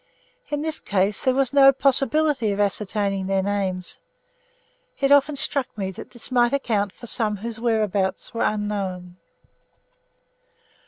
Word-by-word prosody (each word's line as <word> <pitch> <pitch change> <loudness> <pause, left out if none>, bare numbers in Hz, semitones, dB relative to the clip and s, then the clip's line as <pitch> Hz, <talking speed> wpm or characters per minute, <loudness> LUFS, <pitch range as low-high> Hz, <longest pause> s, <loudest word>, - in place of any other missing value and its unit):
In 295 0 -2
this 315 0 -2
case 200 +1 0
there 260 -1 +2
was 270 -1 +1
no 275 -1 +7
possibility 275 -2 +2
of 200 - -3
ascertaining 200 -1 0
their 195 0 +1
names. 190 -2 -1 1.0
It 275 0 +1
often 285 +1 +5
struck 275 -1 0
me 190 -2 -3
that 185 - -10
this 240 +1 -6
might 240 0 +3
account 215 -8 0
for 240 - -13
some 215 -3 0
whose 225 +2 -6
whereabouts 210 -5 -1
were 230 - -3
unknown. 195 -4 -2
215 Hz, 140 wpm, -23 LUFS, 195-270 Hz, 1.0 s, no